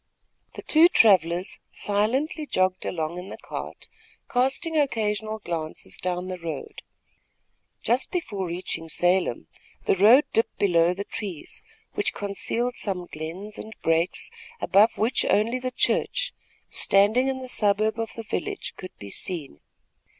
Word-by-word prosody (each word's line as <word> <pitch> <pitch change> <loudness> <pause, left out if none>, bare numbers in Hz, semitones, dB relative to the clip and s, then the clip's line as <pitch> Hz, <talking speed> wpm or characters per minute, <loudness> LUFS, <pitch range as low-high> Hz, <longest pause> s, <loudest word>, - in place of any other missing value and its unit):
The - - -8
two 320 +2 +7
travellers 185 - +3
silently 260 +10 0
jogged 185 -3 +1
along 165 +1 -3
in 185 +2 -8
the - - -7
cart, - - -7 0.4
casting 270 +7 +1
occasional 220 -6 0
glances 165 -6 -5
down 180 0 -3
the 185 -1 -5
road. 165 -4 -6 1.0
Just 250 +3 +1
before 205 - -3
reaching 170 -1 -4
Salem, 175 - +2 0.4
the - - +3
road 220 +9 +7
dipped 225 - +1
below 175 -3 +3
the 200 - -3
trees, 195 -7 -6 0.3
which - - 0
concealed 230 +5 -1
some 185 -3 -2
glens 175 +7 -5
and 220 +1 -8
breaks, 165 +2 +1 0.3
above 210 +4 +4
which 235 +4 +1
only 230 +5 +2
the 255 0 -2
church, - - 0 0.4
standing 210 +6 +3
in 265 -1 -1
the 260 - -7
suburb 215 -1 +2
of 225 -1 -3
the 230 - -6
village, 400 - -4
could 185 - -10
be 100 -1 -9
seen. 155 - -4
205 Hz, 135 wpm, -25 LUFS, 180-240 Hz, 1.0 s, two